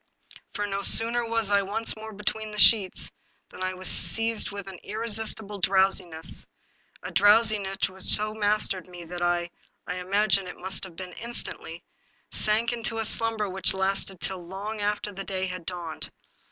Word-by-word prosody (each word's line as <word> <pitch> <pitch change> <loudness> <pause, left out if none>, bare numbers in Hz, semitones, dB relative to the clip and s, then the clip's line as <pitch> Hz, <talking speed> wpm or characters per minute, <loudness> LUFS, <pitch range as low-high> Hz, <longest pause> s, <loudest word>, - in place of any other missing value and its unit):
For 205 - -2
no 200 -1 -3
sooner 230 +4 +6
was 225 -3 -1
I 200 0 +4
once 205 +4 -1
more 220 0 -9
between 215 +1 -4
the 210 - -9
sheets 210 -3 +4 0.4
than - - -13
I 185 0 -3
was 185 0 -2
seized 225 0 +2
with 200 -1 -8
an 190 -2 -10
irresistible 220 -1 -2
drowsiness, 185 -3 +4 0.6
a - - -6
drowsiness 205 -1 +3
which 190 0 -8
so 215 +3 +5
mastered 205 -3 0
me 175 -1 -10
that 175 +1 -8
I 175 0 -1 0.2
— - - -44
I 180 - -4
imagine 195 +1 0
it 180 - -9
must 190 +1 -2
have 180 -3 -13
been 180 0 -8
instantly 200 -7 -5 0.3
— - - -40
sank 225 +3 +1
into 225 -1 -3
slumber 225 -1 -1
which 190 0 +1
lasted 190 -1 -2
till 185 -1 -3
long 200 +5 -7
after 210 0 -2
day 195 -1 -4
had 185 -2 -7
dawned. 175 -3 -5
195 Hz, 165 wpm, -26 LUFS, 185-215 Hz, 0.6 s, sooner